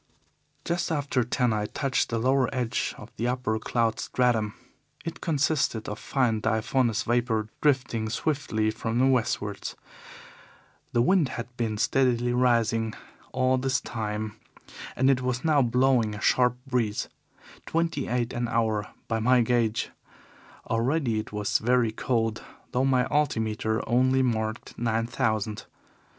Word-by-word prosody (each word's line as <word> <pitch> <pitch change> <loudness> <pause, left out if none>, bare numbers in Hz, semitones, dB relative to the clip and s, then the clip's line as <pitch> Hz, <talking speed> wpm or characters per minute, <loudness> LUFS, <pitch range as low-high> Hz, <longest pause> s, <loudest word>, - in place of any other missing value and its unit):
"Just 175 0 -1
after 140 -4 0
ten 125 0 +1
I 105 -1 -1
touched 135 +1 -1
the 115 - -1
lower 130 +2 +2
edge 125 -4 -1
of - - -12
the 120 - -1
upper 125 -3 -1
cloud 115 0 0
stratum. 115 -5 +1 0.5
It 165 0 -6
consisted 145 -7 0
of 105 - -5
fine 120 -5 +1
diaphanous 115 +1 +1
vapour 115 -2 0
drifting 125 -6 +1
swiftly 110 -4 0
from 115 +1 -3
the 130 - +4
westwards. 110 -6 0 1.2
The 120 - +3
wind 170 -1 +3
had 120 +1 -7
been 115 -3 -2
steadily 120 +1 +2
rising 115 -3 +2 0.4
all 130 0 +2
this 130 -1 +1
time 110 -1 -4 0.6
and 130 - +2
it 135 -2 +4
was 125 +2 -2
now 150 -3 +4
blowing 125 -3 +2
a - - -7
sharp 125 +3 +3
breeze 120 -5 -1 0.6
twenty 165 0 -1
eight 120 0 -1
an 120 0 -1
hour 110 -2 0 0.2
by 110 -1 0
my 125 +2 +4
gauge. 115 -1 +1 0.8
Already 120 0 +1
it 110 - -6
was 105 -1 0
very 120 0 +2
cold, 115 -1 -1 0.3
though 130 +2 +1
my 130 -2 +3
altimeter 110 -6 0
only 130 +2 +3
marked 110 -2 -2
nine 115 -1 0
thousand. 110 -2 -1
120 Hz, 135 wpm, -27 LUFS, 110-130 Hz, 1.2 s, the